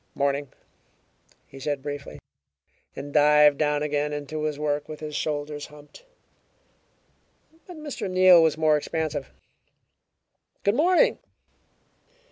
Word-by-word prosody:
"Morning!" 140 -1 -1 0.9
he 135 - -13
said 140 0 -3
briefly, 145 -1 -6 0.8
and 145 0 -8
dived 150 -1 +5
down 150 -1 +1
again 150 0 -1
into 150 +1 -4
his 150 -2 -2
work, 150 -1 -2
with 155 - -8
his 150 -1 -7
shoulders 145 -1 -3
humped. 150 - -16 1.6
But 355 -3 -10
Mr. 295 -10 -5
Neal 185 -2 +6
was 160 -1 +2
more 155 -1 +3
expansive. 150 -2 -4 1.3
"Good 200 - +2
morning!" 360 - +3
150 Hz, 110 wpm, -25 LUFS, 145-160 Hz, 1.6 s, Neal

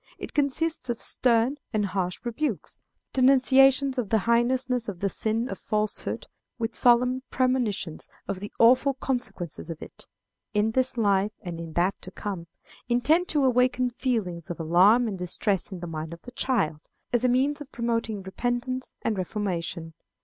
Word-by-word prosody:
It - - -8
consists 295 +1 0
of 235 - -1
stern 245 +3 +2
and 215 -3 +1
harsh 185 -2 -2
rebukes, 240 - -3 0.3
denunciations 270 +1 +5
of 225 -5 -2
the 220 - +3
heinousness 245 +1 +1
of 185 -4 -7
the 200 - 0
sin 225 +4 -1
of 195 - -6
falsehood, 215 0 -2 0.3
with 230 0 -2
solemn 250 +1 +4
premonitions 245 -10 -1 0.2
of 195 -2 -3
the 205 +2 -7
awful 255 +4 +5
consequences 240 - -4
of 165 -1 -6
it, - - -12 0.5
in 210 +2 +2
this 260 +1 +2
life 205 -1 +2
and 170 -2 -6
in 165 -1 -7
that 180 +4 0
to - - -7
come, 185 -3 -6 0.4
intended 305 +9 +3
to 290 -3 +2
awaken 250 0 +2
feelings 215 - -2
of 175 - -5
alarm 190 +9 +5
and 195 -4 -4
distress 185 +2 -1
in 185 -2 -7
the - - -4
mind 160 0 -5
of 170 - -12
the 245 - -10
child, 195 - 0 0.3
as 240 0 +2
a 250 - +4
means 275 +4 +1
of 285 - -9
promoting 230 -4 -2
repentance 245 +6 -3
and 215 -4 0
reformation. 175 -4 -3
230 Hz, 165 wpm, -26 LUFS, 190-255 Hz, 0.5 s, denunciations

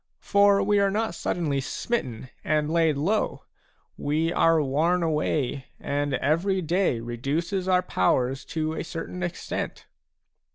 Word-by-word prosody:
For 200 0 +4
we 205 -1 +3
are 200 0 +3
not 220 0 -1
suddenly 155 -4 -1
smitten 130 - -3
and 150 0 +1
laid 165 -3 +3
low; 195 +10 0 0.5
we 160 +3 0
are 165 -1 +4
worn 155 +5 +1
away, 150 -4 0
and 145 -1 -1
every 170 +9 +1
day 175 -6 +1
reduces 145 - -2
our 185 -1 +3
powers 125 +8 +1
to 155 -1 -2
a 160 - -3
certain 180 +2 -6
extent." 175 -1 -4
160 Hz, 130 wpm, -26 LUFS, 140-180 Hz, 0.5 s, For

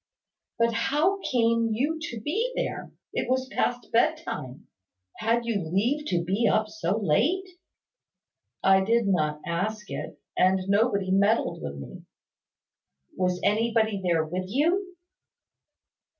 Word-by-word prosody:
"But 230 0 +2
how 305 - +1
came 230 -7 +1
you 295 +8 0
to 235 - -6
be 435 - -1
there? - - -3 0.2
It - - -2
was 260 0 +1
past 245 -2 -2
bedtime. 230 - -1 0.5
Had 230 +2 +1
you 225 -4 0
leave 230 - 0
to 170 -1 0
be 195 +6 +1
up 215 0 +1
so 205 -2 -1
late?" 270 - +1 1.2
"I 190 0 +5
did 230 +2 +2
not 155 -6 0
ask 210 +5 -3
it; - - -6 0.2
and 185 +1 +3
nobody 200 -2 +2
meddled 200 - +2
with 70 -1 -5
me." 70 -3 -10 1.1
"Was 180 -1 0
anybody 220 -1 +1
there 170 -3 +2
with 180 +4 -3
you?" 350 - 0
220 Hz, 125 wpm, -26 LUFS, 185-245 Hz, 1.2 s, I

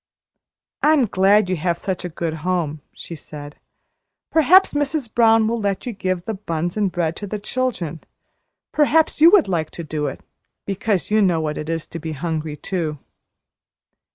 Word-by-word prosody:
"I'm 300 -4 +4
glad 195 0 +3
you 185 - 0
have 170 +1 -1
such 190 0 -4
a 180 - -4
good 160 -1 -3
home," 160 -4 -1
she - - -9
said. 145 -1 -10 0.7
"Perhaps 330 +5 +5
Mrs. 290 -5 -2
Brown 225 -1 +5
will 230 +1 -1
let 200 -2 -2
you 245 - -3
give 185 -3 -2
the 220 - -2
buns 175 -4 -3
and 205 -3 0
bread 165 -2 -1
to 205 - -6
the 210 - -3
children 205 - -3 0.7
perhaps 305 +1 +2
you 330 - +10
would 365 - +5
like 165 -5 -1
to 170 - -4
do 150 -1 -3
it - - -6 0.4
because 200 -2 -1
you 215 0 +4
know 180 -5 +3
what 155 -1 -2
it 150 - -6
is 165 -1 -2
to 165 - -8
be 160 0 -5
hungry, 155 0 -3
too." 160 -5 -3
185 Hz, 175 wpm, -21 LUFS, 160-225 Hz, 0.7 s, you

